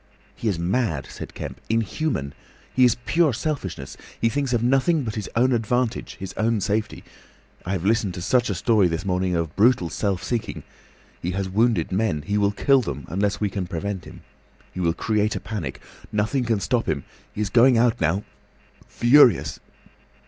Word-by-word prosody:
"He 115 - -4
is 100 -5 +1
mad," 85 - 0
said - - -9
Kemp; - - -7
"inhuman. 115 - -1 0.4
He 130 - +5
is 120 - +4
pure 160 -4 +3
selfishness. 105 - -4 0.2
He 115 - +2
thinks 140 +2 -1
of 120 -2 +1
nothing 135 +5 +2
but 110 -3 -3
his 105 -2 -5
own 125 +3 +3
advantage, 120 +1 -1
his 95 0 -6
own 110 0 +1
safety. 105 +2 -2 0.6
I 95 - -1
have 95 -2 -2
listened 105 -4 +1
to 90 - -5
such 120 +4 +2
a 100 - -1
story 105 +2 +3
this 85 +2 -3
morning 90 -1 0
of 85 -2 -2
brutal 105 -4 +3
self 100 -4 -1
seeking.... 120 -3 -3 0.6
He 85 - -2
has 95 0 -2
wounded 105 -2 +1
men. 95 -6 0
He 100 +6 0
will 100 -1 +3
kill 135 +6 +3
them 70 - -5
unless 100 +2 0
we 105 -2 -1
can 95 -2 -3
prevent 95 +2 -4
him. - - -12 0.5
He - - -6
will 85 -2 +1
create 105 +1 0
a - - -2
panic. 90 - -5 0.3
Nothing 110 +5 0
can 115 -3 +1
stop 120 +1 0
him. 70 -4 -1 0.3
He 105 - -5
is 100 -2 -2
going 125 +2 +6
out 120 0 +2
now—furious!" 105 - +2
105 Hz, 180 wpm, -23 LUFS, 90-120 Hz, 0.6 s, going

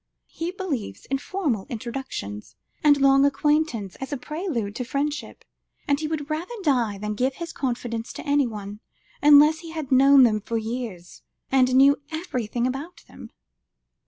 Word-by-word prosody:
He 330 +1 -4
believes 305 - -5
in 270 - +1
formal 285 - -2
introductions, 220 - -6 0.3
and 290 -1 +5
long 275 0 +5
acquaintance 285 - +1
as 270 - -7
a 285 - -1
prelude 285 - -4
to 250 - -2
friendship, 285 +4 -3 0.4
and 285 0 +2
he 310 - -2
would 305 -2 -3
rather 325 +9 -4
die 240 - +1
than 210 +1 -3
give 255 +5 0
his 335 -1 -6
confidence 240 -3 -3
to - - -8
anyone, 220 -8 -1 0.4
unless 295 +2 +7
he 330 0 -10
had 315 -4 -6
known 270 +1 +7
them 215 -3 +3
for 230 +3 -3
years, 220 -6 -6 0.3
and 255 -1 +3
knew 280 +2 +5
everything 250 - -3
about 275 +7 -5
them." - - -12
270 Hz, 155 wpm, -24 LUFS, 230-300 Hz, 0.4 s, unless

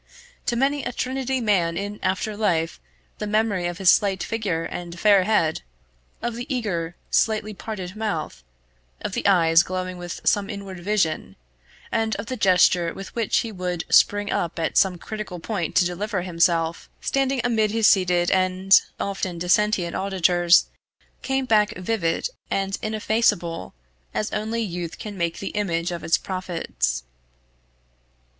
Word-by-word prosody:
To 235 - +1
many 275 +3 +1
a - - -3
Trinity 265 0 -2
man 180 -7 +1
in 205 +1 -4
after 190 +3 -1
life 170 - 0 0.4
the 210 - -3
memory 205 -4 +1
of 175 0 -4
his 190 -2 +6
slight 195 -3 +2
figure 200 -8 -2
and 170 0 -6
fair 200 -2 +5
head, 170 -8 +1 0.6
of 240 0 -1
the 245 +5 -6
eager 175 -9 -2 0.2
slightly 215 -1 +1
parted 190 -3 -6
mouth, 180 - -3 0.6
of - - -4
the - - 0
eyes 165 -4 +5
glowing 185 0 -4
with 175 -1 -6
some 205 0 +2
inward 200 -3 -7
vision, 190 -3 -1 0.6
and 225 -1 0
of 205 - -5
the 255 - -4
gesture 180 -4 +4
with 195 - -8
which 230 -3 +1
he 230 - -5
would 180 -3 -3
spring 205 0 +4
up 170 - -1
at 165 - -1
some 185 -2 +4
critical 210 -1 -6
point 175 -2 -3
to 180 - +5
deliver 190 +2 -2
himself, 170 -2 +1
standing 270 -1 0
amid 220 -3 +2
his 225 +1 +1
seated 180 -4 +4
and 185 +1 +4 0.2
often 190 -3 -3
dissentient 180 0 +1
auditors, 180 -2 +3 0.6
came 270 -1 -1
back 210 -3 +2
vivid 185 - -1 0.2
and 195 0 -1
ineffaceable 210 - 0 0.4
as 215 - -1
only 225 +2 -1
youth 175 -4 -5
can 210 -2 -7
make 170 -2 -2
the 195 - -4
image 175 -4 -1
of 170 -2 -5
its 165 - +3
prophets. 165 - -3
195 Hz, 150 wpm, -23 LUFS, 175-215 Hz, 0.6 s, his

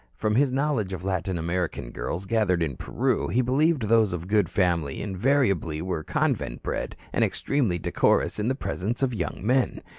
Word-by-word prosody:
From 105 -1 0
his 135 +3 +3
knowledge 135 -8 0
of 90 -1 -5
Latin 95 -1 -1
American 85 -7 -2
girls 90 +9 -4
gathered 95 -5 +1
in 70 -5 -2
Peru, - - -1
he 120 +9 +1
believed 140 +2 +2
those 110 -2 +3
of 90 0 -4
good 100 -3 +2
family 85 -6 0
invariably 100 - +1
were 85 -2 -3
convent - - -1
bred - - -3 0.2
and - - +2
extremely 120 -11 0
decorous 85 - +1
in 105 - 0
the 130 - +1
presence 120 -1 -3
of 130 -2 +1
young 105 -2 -4
men. 125 +2 +1
100 Hz, 175 wpm, -26 LUFS, 90-125 Hz, 0.2 s, his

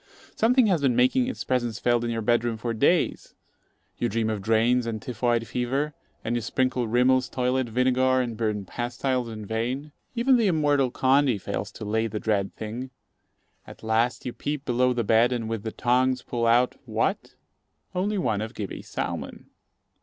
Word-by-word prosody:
Something 245 +2 +4
has 185 -7 +2
been 130 -4 +2
making 130 - +3
its 260 - -4
presence 120 -4 -1
felt 120 -1 +1
in 120 - -1
your 115 -1 -2
bed 120 +1 +2
room 115 -2 -2
for 115 +1 -3
days. 110 - +1 0.6
You - - 0
dream 110 +1 0
of 105 -2 -3
drains 115 +3 +2
and 110 -1 -3
typhoid 120 0 -1
fever, 130 +6 -1 0.3
and 115 - 0
you 120 - 0
sprinkle 125 +1 0
Rimmell's 125 +2 +3
toilet 125 -1 0
vinegar 130 +2 +2
and 120 -3 -2
burn 105 -3 -2
pastiles 120 +3 -2
in 110 -2 -7
vain. 125 +7 -3 0.2
Even 250 +2 +4
the 225 -3 +2
immortal 145 -6 +2
Condy 130 -1 +3
fails - - -4
to - - -8
lay 110 +2 0
the 105 -1 -4
dread 100 -3 -1
thing. 115 +4 -6 0.8
At - - -13
last 110 +2 0
you 125 - -3
peep 145 -1 -4
below 125 +1 +2
the 120 -1 0
bed, 115 +3 +4
and 120 -3 -2
with 115 -2 -3
the 110 +1 -4
tongs 125 +2 +1
pull 115 -1 -1
out 120 +2 +4
what? - - -2 0.6
only 200 +3 -1
one 110 - 0
of 110 +3 -6
Gibbey's 100 -3 -6
salmon. - - -5
120 Hz, 180 wpm, -26 LUFS, 115-130 Hz, 0.8 s, Something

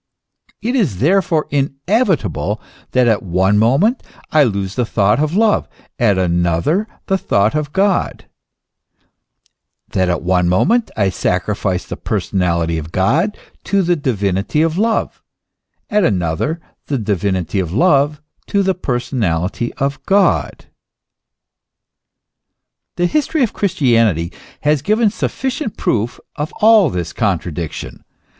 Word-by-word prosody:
It 240 +4 0
is 170 - +1
therefore 165 - +2
inevitable 145 - 0 0.3
that 125 -1 +2
at 110 -3 +2
one 95 +2 +1
moment 145 - +3 0.3
I 155 - +5
lose 100 -6 -1
the 125 - 0
thought 105 0 +1
of 155 +3 0
love, 215 0 +2 0.3
at 105 -5 +3
another 90 - +1 0.2
the 195 0 0
thought 100 - +1
of 150 -1 -2
God, 195 +1 0 1.6
that 95 -1 0
at 85 - -1
one 90 -1 +2
moment 220 - +2
I 100 -3 +2
sacrifice 90 0 -1
the - - -6
personality 85 -3 -1
of 80 +1 -8
God 160 - +1 0.3
to 200 -1 +2
the 175 0 +2
divinity 105 - 0
of 165 -1 0
love, 220 +4 0 0.7
at 210 -2 +2
another 95 - 0 0.3
the 140 - -1
divinity 100 -4 -1
of 90 -3 -2
love 145 - +2 0.3
to 200 -1 +1
the 190 0 +2
personality 120 - -2
of 140 +1 -2
God. 195 0 +2 2.3
The 175 - +1
history 300 - +1
of 230 - -1
Christianity 115 - +1 0.3
has 150 -1 +2
given 215 - +2
sufficient 260 +1 -3
proof 115 +2 -1 0.2
of 150 +2 -3 0.4
this 85 -2 -3
contradiction. 85 -6 -3
125 Hz, 120 wpm, -17 LUFS, -, 2.3 s, I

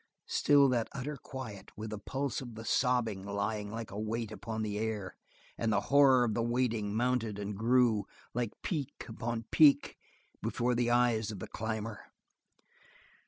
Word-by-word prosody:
Still 145 -1 +5
that 120 -3 0
utter 140 +2 -4
quiet, 110 -7 -8
with 110 0 -5
the 105 - -4
pulse 135 +5 -2
of 120 -3 -8
the 110 +1 -8
sobbing 115 -5 +1
lying 105 +1 -2
like 115 +1 -6
a 100 - -5
weight 110 0 -2
upon 110 0 -4
the 105 -1 -2
air, 105 -4 -3 0.4
and 115 - +1
the 100 - +3
horror 135 -3 +7
of 115 -3 +1
the 115 - 0
waiting 115 -3 0
mounted 115 -3 0
and 100 0 -4
grew, 115 -2 +3 0.3
like 120 -2 -1
peak 145 -6 -3
upon 115 0 -4
peak 145 -2 +5 0.4
before 125 +1 0
the 120 0 +1
eyes 120 -3 +3
of 105 - -5
the - - -6
climber. 110 -1 -4
115 Hz, 165 wpm, -32 LUFS, 105-125 Hz, 0.4 s, horror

